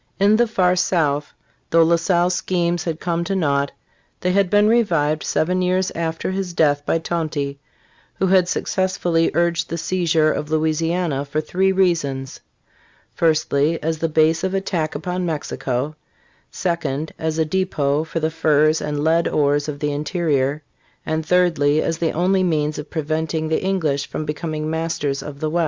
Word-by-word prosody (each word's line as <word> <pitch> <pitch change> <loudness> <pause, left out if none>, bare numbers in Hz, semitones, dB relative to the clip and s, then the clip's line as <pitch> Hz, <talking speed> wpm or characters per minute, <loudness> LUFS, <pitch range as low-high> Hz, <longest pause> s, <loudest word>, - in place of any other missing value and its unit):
In 200 +2 +5
the 240 +1 +3
far 185 -4 +2
South, 150 -5 0 0.4
though 165 0 +5
La 170 +1 +4
Salle's 175 +1 +1
schemes 175 -2 -1
had 165 -2 -3
come 170 -1 -1
to 195 - -1
naught, 140 -5 +1 0.5
they 180 - +1
had 195 0 +2
been 205 +1 +4
revived 165 -10 +2
seven 180 +3 0
years 185 +1 +1
after 165 +2 -2
his 190 -2 -3
death 145 -3 +2
by - - +2
Tonty, 155 -4 -3 0.6
who - - 0
had 185 -1 +4
successfully 175 -4 0
"urged 170 -1 +1
the 170 - -3
seizure 165 -3 +1
of 150 - -4
Louisiana 160 -1 0
for 145 +2 -3
three 185 +5 +1
reasons: 165 -8 0 0.7
firstly, 160 -1 +1
as 160 0 -2
a 165 - +1
base 155 +1 +2
of 190 +1 -1
attack 175 -6 -2
upon 180 +4 -3
Mexico; 145 -3 -3 0.5
secondly, 160 -4 -2
as 160 0 -2
a 160 - +2
depot 155 -5 0
for 160 +1 -4
the 160 0 -1
furs 155 -1 +2
and 150 -1 -2
lead 165 +2 +3
ores 145 0 +1
of 145 - -4
the 145 0 -1
interior; 145 -2 -1 0.4
and 160 0 -1
thirdly, 160 -4 +2
as 165 +1 -1
the 165 - +1
only 185 +3 +1
means 155 -4 0
of 150 - -8
preventing 160 0 -2
the 160 - 0
English 160 -7 0
from 155 - -4
becoming 155 0 -3
masters 160 -3 -2
of 145 -1 -8
the 155 - -1
west." 175 - 0
160 Hz, 165 wpm, -21 LUFS, 150-180 Hz, 0.7 s, In